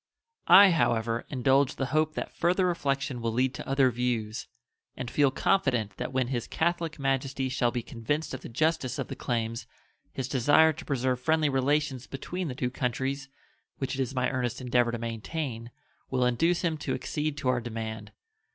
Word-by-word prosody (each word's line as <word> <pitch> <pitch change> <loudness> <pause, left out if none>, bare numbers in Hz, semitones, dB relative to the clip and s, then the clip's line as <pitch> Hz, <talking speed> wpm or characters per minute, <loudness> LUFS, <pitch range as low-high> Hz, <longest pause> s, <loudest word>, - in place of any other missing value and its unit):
I, 200 -1 +9
however, 115 -7 +1
indulge 135 +1 +2
the 135 - -1
hope 155 0 +2
that - - -5
further 180 +2 +2
reflection 140 -7 -1
will 115 -1 -1
lead 130 +2 +1
to - - -7
other 135 -1 +3
views, 120 +1 -2 0.5
and 125 -2 -5
feel 145 -2 +4
confident 130 - +1
that - - -4
when 130 -2 0
His 120 -3 -2
Catholic 165 -1 -1
Majesty 135 -1 -1
shall 125 -2 +1
be 120 0 -3
convinced 130 +8 -3
of 130 - -5
the - - -8
justice 145 +1 0
of - - -4
the - - -5
claims 115 -1 -2 0.4
his 130 -2 -4
desire 145 +5 +4
to 160 +2 -10
preserve 130 -2 0
friendly 155 +2 +2
relations 135 -1 0
between 180 +6 -4
the 130 - -5
two 125 -1 -2
countries, 130 +2 -2 0.5
which 135 -1 -3
it 135 - -1
is 130 +1 -3
my 125 0 +1
earnest 125 -3 -2
endeavor 125 -2 +2
to 120 - -3
maintain, 115 +1 -4 0.4
will 130 -1 +1
induce 165 +9 +2
him 165 -2 0
to - - -2
accede 150 -1 -3
to 135 -3 -1
our 125 -1 +1
demand. 110 -2 -5
130 Hz, 180 wpm, -28 LUFS, 120-150 Hz, 0.5 s, I